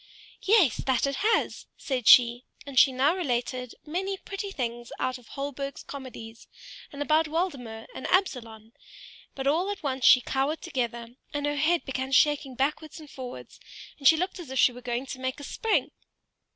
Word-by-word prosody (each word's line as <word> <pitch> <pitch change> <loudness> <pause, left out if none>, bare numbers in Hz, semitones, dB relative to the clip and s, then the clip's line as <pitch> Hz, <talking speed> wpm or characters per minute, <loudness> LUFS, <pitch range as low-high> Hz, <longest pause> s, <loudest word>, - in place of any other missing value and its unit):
"Yes, 390 - +4
that 260 -2 +1
it 275 0 -2
has," 445 +2 0
said 255 -4 -3
she; 245 -1 +7 0.2
and 275 -3 +2
she 270 - +6
now 270 +6 +2
related 250 -6 -2
many 380 +5 -3
pretty 395 +1 -6
things 240 -7 -4
out 255 0 -2
of 245 - -20
Holberg's 275 0 -5
comedies, 240 -5 -9 0.4
and 285 0 -4
about 310 +2 +3
Waldemar 275 -10 -3
and - - -6
Absalon; 230 - -1 0.6
but 270 - -5
all 330 +8 +2
at 405 -3 -5
once 265 -2 -2
she 255 - +8
cowered 270 +5 -2
together, 240 -5 -4 0.2
and 290 0 -1
her 290 0 -1
head 325 +4 +2
began 265 0 -3
shaking 280 -1 +3
backwards 300 +5 -2
and 300 -2 -13
forwards, 255 -2 -9 0.4
and 275 - +3
she 320 - +7
looked 365 +3 -2
as 265 -6 -6
she 250 - +5
were 245 +1 -11
going 245 +1 -3
to 260 -1 -7
make 260 +2 -3
a - - -9
spring. 445 - 0
270 Hz, 175 wpm, -27 LUFS, 250-315 Hz, 0.6 s, she